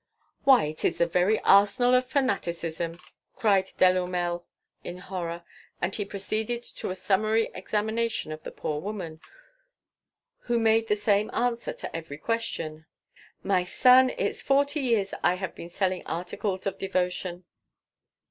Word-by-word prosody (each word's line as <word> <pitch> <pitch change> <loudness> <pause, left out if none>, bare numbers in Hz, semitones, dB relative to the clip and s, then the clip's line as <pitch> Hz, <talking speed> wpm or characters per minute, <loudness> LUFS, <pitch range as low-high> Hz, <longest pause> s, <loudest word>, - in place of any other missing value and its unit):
"Why, 265 -2 +7
it 155 +1 -4
is - - +1
the 170 - +3
very 180 +5 +2
arsenal 205 +5 +5
of 255 0 +3
fanaticism!" 170 - -1 0.4
cried 195 -3 +2
Delourmel 180 -1 +2 0.4
in 175 - -6
horror, 175 -2 -5 0.4
and 175 +2 -1
he 205 - -2
proceeded 215 +4 -2
to - - -6
a 185 - -3
summary 215 +4 +1
examination 220 -1 -1
of 155 0 -6
the - - -5
poor 150 -1 -4
woman, 180 -6 -6 1.2
who 240 -1 +1
made 225 0 +3
the 210 - +2
same 210 0 +1
answer 235 0 0
to - - -8
every 160 -3 -6
question: 160 -7 -3 0.6
"My 190 -2 +2
son, 255 +7 +6
it's - - -1
forty 280 +2 +2
years 230 -7 +1
I 180 - +3
have 190 0 -5
been 170 - -9
selling 185 0 -1
articles 185 +3 -3
of 195 - -3
devotion." 180 -1 -2
195 Hz, 140 wpm, -27 LUFS, 175-225 Hz, 1.2 s, Why